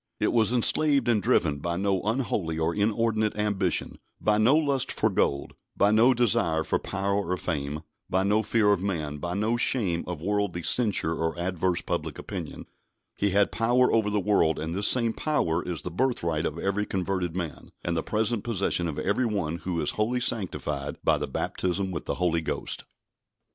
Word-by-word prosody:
It -, -, +1 dB
was 115 Hz, -1 st, +3 dB
enslaved 135 Hz, +2 st, +3 dB
and 115 Hz, -3 st, +3 dB
driven 75 Hz, -5 st, +2 dB
by 85 Hz, +3 st, -2 dB
no 95 Hz, 0 st, 0 dB
unholy 105 Hz, -7 st, -1 dB
or 80 Hz, +1 st, 0 dB
inordinate 110 Hz, +1 st, +1 dB
ambition, 105 Hz, -4 st, -1 dB, 0.2 s
by 105 Hz, 0 st, +2 dB
no 120 Hz, +7 st, +5 dB
lust 140 Hz, -4 st, +1 dB
for -, -, +1 dB
gold, 70 Hz, 0 st, 0 dB, 0.2 s
by 100 Hz, +1 st, +4 dB
no 120 Hz, +4 st, +5 dB
desire 85 Hz, -9 st, +2 dB
for -, -, 0 dB
power 100 Hz, 0 st, -2 dB, 0.2 s
or 90 Hz, -, 0 dB
fame, 75 Hz, -4 st, -3 dB, 0.3 s
by 95 Hz, +1 st, +1 dB
no 105 Hz, +2 st, +2 dB
fear 105 Hz, -1 st, +3 dB
of 95 Hz, -, -1 dB
man, 80 Hz, -7 st, -2 dB
by 85 Hz, +3 st, -3 dB
no 110 Hz, +4 st, 0 dB
shame 100 Hz, -9 st, +1 dB
of 90 Hz, -3 st, -4 dB
worldly 100 Hz, -1 st, -1 dB
censure 105 Hz, -8 st, +1 dB
or 80 Hz, +1 st, -2 dB
adverse 90 Hz, 0 st, 0 dB
public -, -, -3 dB
opinion. -, -, -7 dB, 0.5 s
He 100 Hz, -, +1 dB
had 100 Hz, +1 st, +3 dB
power 120 Hz, +3 st, +2 dB
over 110 Hz, -2 st, +2 dB
the 105 Hz, 0 st, 0 dB
world, 90 Hz, -6 st, +2 dB
and 80 Hz, +1 st, -4 dB
this 100 Hz, +3 st, +2 dB
same 115 Hz, -3 st, +3 dB
power 90 Hz, -, 0 dB
is 85 Hz, -5 st, -5 dB
the 90 Hz, -, -5 dB
birthright 85 Hz, -8 st, 0 dB
of 80 Hz, -, -6 dB
every 100 Hz, +4 st, -1 dB
converted 90 Hz, -2 st, -2 dB
man, 85 Hz, -4 st, -5 dB
and 85 Hz, -, -1 dB
the 80 Hz, -, 0 dB
present 110 Hz, +2 st, -1 dB
possession 95 Hz, -6 st, -1 dB
of 75 Hz, -, -4 dB
every 115 Hz, +5 st, 0 dB
one 90 Hz, -7 st, -2 dB
who 90 Hz, -1 st, -3 dB
is -, -, +1 dB
wholly 115 Hz, +4 st, 0 dB
sanctified 75 Hz, -, -2 dB
by -, -, +3 dB
the -, -, -3 dB
baptism 95 Hz, +1 st, -2 dB
with 85 Hz, -, -5 dB
the -, -, -2 dB
Holy 85 Hz, -2 st, +1 dB
Ghost. 80 Hz, -, -3 dB
100 Hz, 185 wpm, -27 LUFS, 85-110 Hz, 0.5 s, no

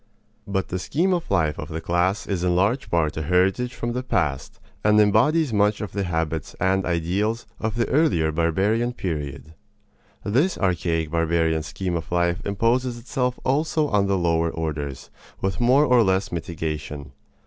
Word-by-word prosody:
But 95 Hz, -2 st, -2 dB
the 90 Hz, -, -2 dB
scheme 175 Hz, -, 0 dB
of 175 Hz, -2 st, -2 dB
life 80 Hz, -6 st, +1 dB
of 75 Hz, -, -6 dB
the 80 Hz, 0 st, -4 dB
class 85 Hz, +5 st, 0 dB
is 95 Hz, -3 st, -2 dB
in 90 Hz, -1 st, +2 dB
large 105 Hz, +9 st, +1 dB
part 80 Hz, -3 st, +1 dB
a -, -, -1 dB
heritage 95 Hz, +9 st, +1 dB
from 120 Hz, 0 st, -3 dB
the 125 Hz, -, -2 dB
past, 90 Hz, -, -2 dB, 0.2 s
and 105 Hz, 0 st, +5 dB
embodies 120 Hz, +8 st, +3 dB
much 105 Hz, 0 st, +2 dB
of 105 Hz, -, -5 dB
the 100 Hz, -1 st, -2 dB
habits 80 Hz, -2 st, -2 dB
and 95 Hz, +1 st, +1 dB
ideals 95 Hz, +7 st, -1 dB
of 110 Hz, 0 st, -2 dB
the 115 Hz, -1 st, 0 dB
earlier 130 Hz, -, +2 dB
barbarian 95 Hz, +9 st, +1 dB
period. 75 Hz, -, -5 dB, 0.7 s
This 135 Hz, -, +1 dB
archaic, 85 Hz, -4 st, 0 dB
barbarian 80 Hz, -1 st, +1 dB
scheme 90 Hz, +3 st, -4 dB
of 80 Hz, 0 st, -5 dB
life 85 Hz, 0 st, +1 dB
imposes 120 Hz, +5 st, +1 dB
itself 125 Hz, +1 st, -2 dB
also 150 Hz, +2 st, +1 dB
on 100 Hz, -4 st, +2 dB
the 100 Hz, 0 st, +1 dB
lower 85 Hz, -1 st, +1 dB
orders, 75 Hz, -5 st, -5 dB, 0.3 s
with 95 Hz, -2 st, -2 dB
more 130 Hz, +5 st, +5 dB
or 125 Hz, -4 st, +5 dB
less 95 Hz, -2 st, +1 dB
mitigation. 75 Hz, -4 st, -5 dB
95 Hz, 165 wpm, -23 LUFS, 80-115 Hz, 0.7 s, and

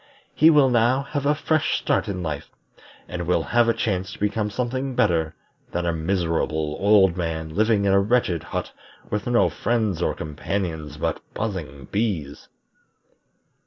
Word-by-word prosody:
He 155 Hz, -, +6 dB
will 145 Hz, -5 st, +5 dB
now 120 Hz, +3 st, +3 dB
have 140 Hz, 0 st, -3 dB
a 150 Hz, -, +3 dB
fresh 155 Hz, +1 st, +1 dB
start -, -, 0 dB
in 95 Hz, -3 st, -3 dB
life, 75 Hz, -3 st, -4 dB, 0.6 s
and 85 Hz, -1 st, -5 dB
will 90 Hz, -, +2 dB
have 120 Hz, -1 st, +2 dB
a -, -, +4 dB
chance 95 Hz, -4 st, -1 dB
to -, -, -10 dB
become 105 Hz, +1 st, 0 dB
something 130 Hz, +4 st, -3 dB
better 80 Hz, -8 st, +1 dB, 0.4 s
than 90 Hz, 0 st, -1 dB
a 85 Hz, -, +1 dB
miserable 80 Hz, -3 st, -1 dB
old 100 Hz, -3 st, +5 dB
man 80 Hz, -3 st, -3 dB
living 110 Hz, +1 st, +2 dB
in 100 Hz, -, +3 dB
a 100 Hz, -, +5 dB
wretched 100 Hz, -5 st, +1 dB
hut -, -, -4 dB, 0.4 s
with 105 Hz, +1 st, -2 dB
no 120 Hz, -1 st, +4 dB
friends 110 Hz, -6 st, -1 dB
or -, -, 0 dB
companions 80 Hz, -1 st, -4 dB
but -, -, -2 dB
buzzing 80 Hz, -11 st, -4 dB
bees." 95 Hz, -10 st, -2 dB
100 Hz, 160 wpm, -23 LUFS, 80-115 Hz, 0.6 s, He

